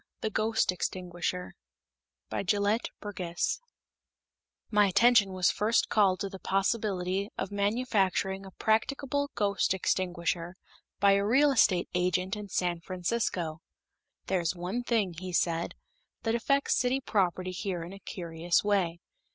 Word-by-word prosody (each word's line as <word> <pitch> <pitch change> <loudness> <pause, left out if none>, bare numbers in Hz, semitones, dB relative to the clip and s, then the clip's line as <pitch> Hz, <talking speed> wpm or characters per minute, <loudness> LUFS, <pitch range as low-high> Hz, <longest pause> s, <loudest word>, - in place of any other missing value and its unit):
The 220 - -1
Ghost 220 -1 +1
Extinguisher 180 0 -3 0.8
BY - - -1
GELETT 205 +4 +1
BURGESS 185 - -2 1.1
My 210 -1 +5
attention 220 0 +5
was 185 -1 +2
first 220 +2 +1
called 195 -4 +3
to 200 - -2
the 190 -1 -9
possibility 195 -1 0
of 195 - -3
manufacturing 200 -2 0
a 195 - -9
practicable 275 +8 0
ghost 200 -2 +1
extinguisher 175 -1 -1 0.4
by 200 -1 +5
a 200 0 +3
real 270 +8 +4
estate 195 -8 +3
agent 180 +2 0
in 210 -1 -7
San 175 -2 0
Francisco. 180 -3 -2 0.6
"There's 180 -2 0
one 180 +7 -3
thing," 225 -7 0
he 185 0 -6
said, 170 -1 0 0.5
"that 225 - +1
affects 275 +4 +2
city 255 +2 +1
property 185 -6 0
here 185 -2 -3
in 175 +3 -8
a 195 - -10
curious 170 -2 -1
way. 185 -5 +1
195 Hz, 130 wpm, -29 LUFS, 180-215 Hz, 1.1 s, My